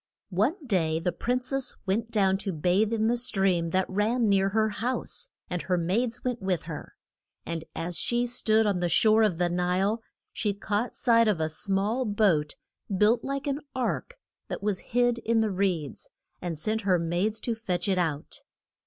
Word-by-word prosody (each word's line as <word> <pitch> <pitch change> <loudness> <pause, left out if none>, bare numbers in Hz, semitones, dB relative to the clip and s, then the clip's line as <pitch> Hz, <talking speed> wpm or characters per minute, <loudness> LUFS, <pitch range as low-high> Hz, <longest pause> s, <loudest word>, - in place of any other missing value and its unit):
One 215 - +2
day 165 -9 +1
the 175 +2 0
prin 245 +8 -1
cess 270 +1 -1
went 215 +4 0
down 195 -4 +2
to 200 - -2
bathe 180 +6 +1
in 220 -1 +1
the 235 +2 +3
stream 195 -8 +2
that 185 +3 +1
ran 220 +5 +1
near 195 -1 +3
her 220 +2 +2
house. 235 +4 -4 0.2
And 180 -1 -3
her 180 -1 0
maids 225 +8 -1
went 250 -3 -2
with 190 -3 -1
her. 165 -2 -8 0.5
And 165 -1 -4
as 165 +1 -2
she 240 0 +1
stood 225 -2 +3
on 200 -3 +1
the 175 0 0
shore 220 +4 +4
of 210 -6 +2
the 175 0 +2
Nile, 180 +5 0 0.3
she 205 0 -1
caught 205 +3 -2
sight 230 -2 +4
of 205 -6 +2
a 160 0 0
small 200 +9 -1
boat 200 -9 +2 0.4
built 215 +5 +3
like 275 0 -3
an 280 0 -1 0.2
ark, 260 - -2 0.3
that - - -5
was 205 -3 0
hid 245 0 +1
in 230 0 +1
the 220 -2 +1
reeds, 180 -7 -2 0.3
and 175 -3 -3
sent 215 +8 -1
her 190 -3 +3
maids 175 +6 -1
to 235 - -1
fetch 185 -5 -2
it 190 -2 +2
out. 155 -4 -2
205 Hz, 185 wpm, -27 LUFS, 180-230 Hz, 0.5 s, shore